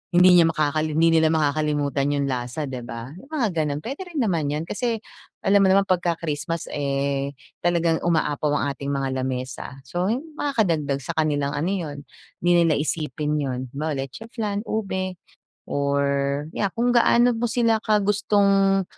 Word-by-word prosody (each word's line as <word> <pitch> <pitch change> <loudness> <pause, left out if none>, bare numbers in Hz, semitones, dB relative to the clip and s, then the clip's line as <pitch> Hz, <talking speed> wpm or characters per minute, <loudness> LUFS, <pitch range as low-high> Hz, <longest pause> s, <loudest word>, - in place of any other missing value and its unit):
hindi 180 +1 +7
niya 165 - +6
makakali 155 -1 0
hindi 165 0 +5
nila 160 - +4
makakalimutan 150 -2 +1
yung 140 - 0
lasa, 130 +2 -3
di 130 -3 -5
ba? 115 +1 -7
Yung 270 - -15
mga 290 -6 0
gano'n. 150 -4 -1
Puwede 270 +4 -5
rin 315 -7 -1
naman 170 -8 0
'yon. 150 +2 -2
Kasi, 230 +7 -2 0.5
alam 200 +1 +4
mo 195 - +5
naman 195 +1 +5
pagka 175 -3 +1
Christmas, 165 +1 -4
eh, 140 0 -1 0.2
talagang 170 -1 +1
umaapaw 150 -3 +1
ang 140 -1 0
ating 140 +1 -4
mga 135 -1 -1
lamesa. 130 0 -4
So, 175 +8 -2
hin 240 +7 -1 0.2
makakadagdag 165 - 0
sa 170 - -3
kanilang 145 -2 +1
ano 150 +4 -1
yon, 170 -7 -3 0.4
hindi 175 - +2
nila 160 -3 +2
iisipin 150 -1 -1
yon. 130 -2 -2 0.2
Halimbawa, 155 +2 -2 0.2
leche 140 - -10
flan, 210 -3 -2
ube 190 -5 -3 0.4
or 140 0 0
yeah 200 -2 0
kung 240 +2 +2
gaano 240 +1 +5
mo 225 - -4
sila 230 -1 +2
ka 215 - +3
gustong 200 -1 +3
160 Hz, 170 wpm, -24 LUFS, 140-195 Hz, 0.5 s, hindi